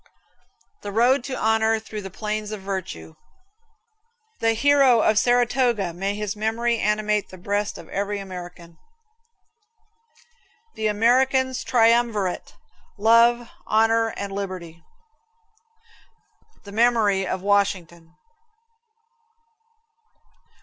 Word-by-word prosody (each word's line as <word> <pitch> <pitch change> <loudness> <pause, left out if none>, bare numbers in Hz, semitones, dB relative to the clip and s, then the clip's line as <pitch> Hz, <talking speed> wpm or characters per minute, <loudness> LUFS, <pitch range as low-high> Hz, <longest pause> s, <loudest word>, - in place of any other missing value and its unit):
The 205 - -6
road 240 +5 +3
to 260 - -4
honor 220 0 +2
through 215 -1 -8
the 195 - -8
plains 210 +2 -4
of 215 -2 -6
virtue. 185 - -6 1.3
The 225 0 +2
hero 270 -1 +4
of 215 0 +3
Saratoga 240 -5 +1
may 195 +4 -3
his 210 0 -4
memory 225 +2 -1
animate 210 0 0
the 185 - -12
breast 205 +3 -2
of - - -12
every 200 +1 -3
American. 175 -3 -10 1.9
The 220 - -2
American's 260 +4 +2
triumvirate, 230 -5 +1 0.4
love, 230 +2 +4 0.2
honor 225 +1 +2
and 200 -1 -5
liberty. 185 -4 -6 1.8
The 200 - -11
memory 215 -4 +2
of 185 0 -4
Washington. 180 -4 -1
210 Hz, 95 wpm, -23 LUFS, 195-230 Hz, 1.9 s, hero